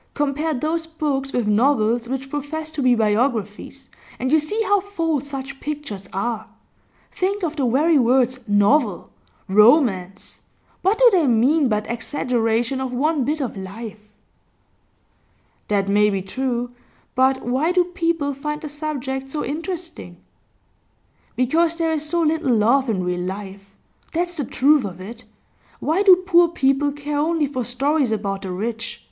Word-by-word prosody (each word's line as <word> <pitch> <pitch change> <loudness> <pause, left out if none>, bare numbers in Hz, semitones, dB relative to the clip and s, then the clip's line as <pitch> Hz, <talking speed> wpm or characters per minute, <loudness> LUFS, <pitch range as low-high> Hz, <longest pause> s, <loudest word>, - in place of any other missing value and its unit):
Compare 295 +2 -1
those 320 +5 -2
books 285 -4 -2
with 245 -5 -1
novels 230 +1 +2
which 270 +1 -4
profess 305 +2 -4
to 310 -2 -4
be 250 -2 +4
biographies, 225 +3 -1 0.3
and 260 +2 -2
you 315 - +5
see 305 +9 -2
how 405 0 +3
false 330 -8 -2
such 275 -1 -6
pictures 280 -11 -6
are. 220 +3 -3 0.6
Think 390 +2 -2
of 320 -2 -2
the 275 -5 0
very 295 +6 +3
words 255 +1 +2
"novel," 205 - +2 0.4
"romance" 200 - +3 0.4
what 390 +4 +2
do - - +6
they 345 -7 +3
mean 260 +5 +3
but 210 -1 -1
exaggeration 240 0 -1
of 260 -1 -3
one 290 +3 0
bit 300 +4 -1
of 255 - -3
life?' 210 +2 -9 1.6
'That 200 -2 0
may 210 +1 +3
be 195 -2 -2
true. 245 +3 -3 0.4
But 260 +1 +2
why 265 +8 +1
do 360 0 +3
people 335 -5 -1
find 300 +2 -4
the 305 - -7
subject 275 -3 -4
so 295 +2 -3
interesting?' 330 - -6 1.2
'Because 320 +7 +2
there 330 -1 0
is 305 -2 -1
so 335 +2 0
little 305 -6 +1
love 240 +5 +3
in 190 -5 0
real 180 0 -2
life. 195 +1 -7 0.4
That's 350 +1 -1
the 285 - -2
truth 285 +2 +3
of 185 -3 -6
it. 225 +5 -9 0.5
Why 325 +6 +1
do 385 -3 +8
poor 345 -2 +5
people 285 -3 +1
care 290 0 -4
only 320 0 +1
for 255 -3 -3
stories 270 +2 0
about 200 -2 -2
the 190 - -5
rich? 230 +4 -4
270 Hz, 155 wpm, -21 LUFS, 225-310 Hz, 1.6 s, do